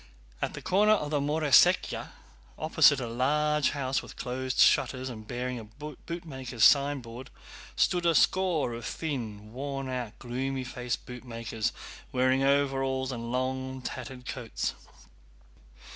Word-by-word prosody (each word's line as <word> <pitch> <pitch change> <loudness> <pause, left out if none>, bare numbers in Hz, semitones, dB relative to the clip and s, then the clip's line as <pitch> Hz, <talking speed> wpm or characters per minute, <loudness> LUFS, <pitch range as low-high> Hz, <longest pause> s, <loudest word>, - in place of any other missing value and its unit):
At - - -1
the - - -8
corner 210 +3 +4
of 150 -8 -1
the 150 - +2
Moroséyka, 145 -1 +3 0.5
opposite - - +5
a 125 - -3
large 150 +5 +1
house 135 -2 -1
with - - -12
closed 130 +1 -3
shutters 130 0 +4
and 110 -3 -9
bearing 125 0 -3
a - - -8
bootmaker's 135 0 -6
signboard, 130 -4 +3 0.5
stood 175 -1 +2
a 165 - +3
score 175 -10 +2
of 115 0 -6
thin, 110 -10 -5
worn 135 0 -4
out, 125 -4 -4
gloomy 130 +2 -3
faced 125 -1 -4
bootmakers, 115 -3 -4 0.4
wearing 130 +1 +2
overalls 135 -1 +1
and 115 -1 -5
long 130 +1 -2
tattered 125 0 -6
coats. 120 -4 -3
130 Hz, 130 wpm, -29 LUFS, 125-145 Hz, 0.5 s, opposite